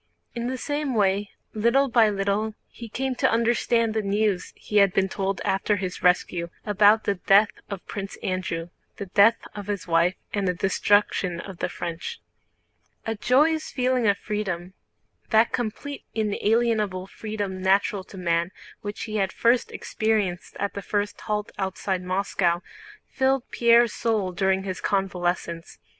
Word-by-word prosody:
In 235 0 -3
the 260 +1 -2
same 290 0 -2
way 200 -1 +2 0.2
little 235 +6 +3
by 230 -3 +4
little 205 +2 -1
he 235 -1 -10
came 265 +4 -2
to - - +3
understand 230 0 +2
the 220 - 0
news 205 -1 0
he 210 - -3
had 200 -2 +5
been 195 0 +3
told 195 0 -2
after 195 +2 +1
his 185 -2 -4
rescue, 180 -1 +2 0.2
about 210 +1 +5
the 200 - +1
death 200 +3 +4 0.2
of 200 -3 -6
Prince 195 -1 -6
Andrew, 175 -2 -2 0.3
the 200 - -5
death 200 +4 +5 0.2
of 205 -1 -7
his 200 -5 -3
wife, 170 +2 +3 0.2
and 200 -2 0
the 180 - +1
destruction 195 -1 +1
of 190 0 -9
the - - -1
French. 175 - -5 0.9
A 225 - -1
joyous 300 +8 +2
feeling 255 -2 +1
of 200 0 +3
freedom—that 210 +3 -2
complete 245 +5 -4
inalienable 215 -2 +1
freedom 205 -2 -5
natural 195 +1 +2
to 195 - -12
man 170 -1 0 0.3
which 205 0 -5
he 215 -1 -3
had 195 -2 0
first 235 +1 +2
experienced 210 -5 -1
at 200 0 -1
the 200 - -5
first 205 +1 -2
halt 210 -1 -2
outside 190 -1 -2
Moscow—filled 195 +8 -1
Pierre's 235 -1 +4
soul 215 -5 0
during 190 +1 +1
his 185 -1 -5
convalescence. 175 - -2
205 Hz, 150 wpm, -25 LUFS, 190-225 Hz, 0.9 s, had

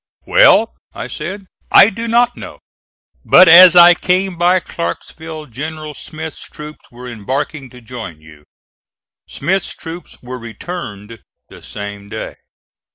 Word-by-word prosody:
"Well," - - +4 0.2
I - - -6
said, 200 0 -7 0.3
"I 210 - +7
do 230 +3 -6
not 240 +1 +2
know; - - -10 0.7
but 185 +1 +6
as 175 +2 +9
I 175 0 +8
came 185 +1 -1
by 175 +2 +2
Clarksville 160 -2 -7
General 155 +4 -7
Smith's 160 +2 -9
troops 150 0 -12
were 125 +1 -12
embarking 130 +5 -5
to 125 0 -15
join 110 -9 -9
you." 75 -1 -18 0.8
Smith's 190 +6 -3
troops 165 0 -10
were 125 +1 -7
returned 115 - -9 0.3
the - - -15
same 100 0 -9
day. - - -7
155 Hz, 130 wpm, -16 LUFS, 120-180 Hz, 0.8 s, as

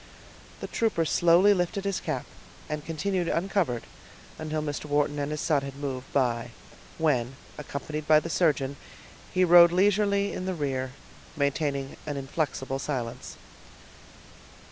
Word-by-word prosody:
The - - -4
trooper 220 -8 0
slowly 175 +6 +5
lifted 190 +1 -1
his 200 -1 0
cap, - - -3 0.4
and 150 -1 -4
continued 175 +3 -1
uncovered 170 - 0 0.6
until 155 -1 -2
Mr. 145 -1 -4
Wharton 145 0 +1
and 145 0 -2
his 150 0 -3
son 150 -4 +2
had 140 -1 -7
moved 135 -2 -5
by, 120 -3 +1 0.5
when, 135 -6 +1 0.2
accompanied 150 +1 -5
by 155 -1 +7
the 160 - -6
surgeon, 145 -5 +1 0.5
he 185 - +2
rode 170 -1 +8
leisurely 200 +2 +2
in 185 - -4
the 185 - -1
rear, 130 -4 -2 0.4
maintaining 140 -1 -1
an 145 -1 -3
inflexible 135 -1 -2
silence. 125 -5 -4
150 Hz, 135 wpm, -27 LUFS, 140-175 Hz, 0.6 s, rode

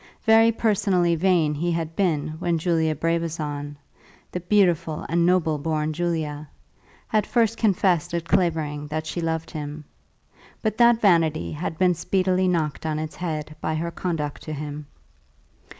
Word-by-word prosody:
Very 225 0 +6
personally 195 -6 +2
vain 165 -3 +2
he 170 +4 -1
had 165 -1 -3
been 165 -7 0
when 175 -2 0
Julia 160 -1 +1
Brabazon, 155 -3 -2 0.5
the 180 - -3
beautiful 175 -4 +1
and 170 +1 +2
noble 165 -4 +2
born 155 0 -1
Julia, 155 -3 -3 0.6
had 215 -2 +1
first 230 -2 +2
confessed 190 -7 +1
at 170 -1 -2
Clavering 155 -5 0
that 155 +1 -3
she 170 +2 -4
loved 165 -1 -2
him; 150 -1 -6 0.8
but 220 0 -1
that 235 -1 +6
vanity 165 -5 +3
had 160 +1 -4
been 180 0 +3
speedily 185 +2 +1
knocked 160 -5 -1
on 155 -1 -1
its 155 0 -5
head 155 -3 -4
by 155 - -1
her 170 +2 -2
conduct 160 -5 -3
to 155 - -6
him. 150 0 -6
165 Hz, 150 wpm, -24 LUFS, 155-180 Hz, 0.8 s, Very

